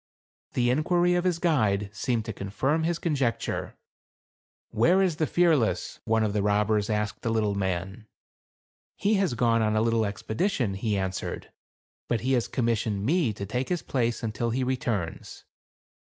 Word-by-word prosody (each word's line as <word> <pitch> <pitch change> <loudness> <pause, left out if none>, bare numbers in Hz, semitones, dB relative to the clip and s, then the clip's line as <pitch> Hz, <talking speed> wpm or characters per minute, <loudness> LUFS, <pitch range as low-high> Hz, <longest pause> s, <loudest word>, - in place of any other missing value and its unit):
The 120 -1 +2
inquiry 175 +6 +2
of 175 0 +1
his 180 -3 +2
guide 110 - +1
seemed 115 0 -1
to 110 - -4
confirm 130 +11 -1
his 170 0 0
conjecture. 140 - -1 0.5
" - - -
Where 170 - +4
is 185 -5 +1
the 155 - +1
Fearless? 145 - +1
" - - -66
one 110 0 +2
of 105 -2 0
the 105 - +1
robbers 105 +1 +1
asked 105 -1 -1
the 115 - -2
little 110 -2 +1
man. 95 +2 -3 0.5
" - - - 0.3
He 205 - +1
has 180 -11 0
gone 115 -1 +2
on 110 0 +1
a 110 - +3
little 115 -1 +2
expedition," 110 - -1
he 105 +1 -1
answered, 95 -1 -4 0.6
"but 115 -4 0
he 130 +3 +1
has 120 -3 +1
commis 115 -3 0
sioned 100 -3 -2
me 155 - +2
to 100 -1 -6
take 125 +6 -3
his 180 -2 -1
place 120 -3 -1
until 115 +1 -1
he 130 +3 0
returns." 125 - -3
115 Hz, 175 wpm, -27 LUFS, 105-145 Hz, 0.6 s, Where